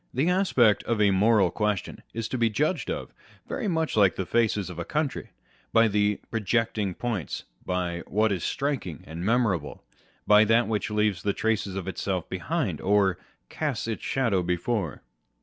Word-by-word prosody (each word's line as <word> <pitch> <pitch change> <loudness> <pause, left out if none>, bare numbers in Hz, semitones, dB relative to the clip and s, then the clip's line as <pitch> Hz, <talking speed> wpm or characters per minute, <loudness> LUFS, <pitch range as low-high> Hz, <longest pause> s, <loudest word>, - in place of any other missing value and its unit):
The 150 +8 +2
aspect 130 - +3
of 115 -2 0
a 100 -1 +4
moral 100 -1 +4
question 105 -3 -2
is 115 0 -3
to 130 - -2
be 115 -1 +3
judged 150 - 0
of - - -4 0.3
very 240 - -3
much 160 -4 0
like 100 -5 +4
the 95 - -2
face 115 +1 +2
of 90 -4 -5
a - - -2
country, 150 - -2 0.4
by 115 0 +5
the 105 -1 +1
projecting 110 -3 0
points, 115 -9 -3 0.2
by 90 -2 -1
what 110 +1 +2
is 95 -4 -2
striking 135 - -2
and 80 +2 -7
memorable, 105 -8 0 0.4
by 105 0 +7
that 115 +2 +3
which 105 -2 -1
leaves 105 -4 +1
traces 100 0 -1
of 95 -2 -4
itself 95 -1 -2
behind, - - -2
or 95 -2 +2
" - - -42
casts 145 -8 -2
its 115 - -3
shadows 105 -10 0
before." 90 -1 -1
105 Hz, 165 wpm, -26 LUFS, 95-115 Hz, 0.4 s, by